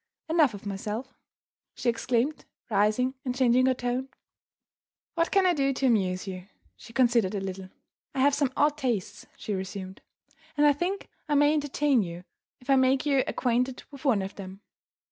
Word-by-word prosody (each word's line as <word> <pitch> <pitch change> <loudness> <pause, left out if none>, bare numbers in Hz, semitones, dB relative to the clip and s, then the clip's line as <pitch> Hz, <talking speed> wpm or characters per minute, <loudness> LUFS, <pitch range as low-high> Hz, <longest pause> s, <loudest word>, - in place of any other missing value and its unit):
Enough 310 -8 +3
of 200 - -11
myself!" 210 +6 -4 0.6
she 255 - -4
exclaimed, 240 +4 0 0.3
rising 215 +5 +2
and 250 -3 -2
changing 255 0 +4
her 260 - +3
tone. 250 +2 -2 1.0
"What 335 0 +1
can 390 -1 +3
I 360 - +4
do 275 -3 +1
to 265 - -1
amuse 190 -7 +1
you?" 185 -1 -7 0.3
She - - -14
considered 235 -5 +2
a - - -1
little. 190 -1 -6 0.5
"I 265 - +1
have 285 +1 +4
some 280 -2 +1
odd 295 0 +3
tastes," 240 -9 -2
she 210 - -4
resumed; 190 0 -6 0.6
"and 295 - +4
I 295 - +6
think 360 +7 -3 0.2
I 295 - +2
may 290 +1 +5
entertain 290 -3 +2
you 175 -2 -6 0.4
if 250 - -20
I 275 -1 +5
make 260 +1 +3
you 275 -2 +3
acquainted 250 +1 0
with 280 -1 -12
one 230 -9 +2
of 195 - -6
them. 195 0 -9
250 Hz, 175 wpm, -27 LUFS, 205-280 Hz, 1.0 s, I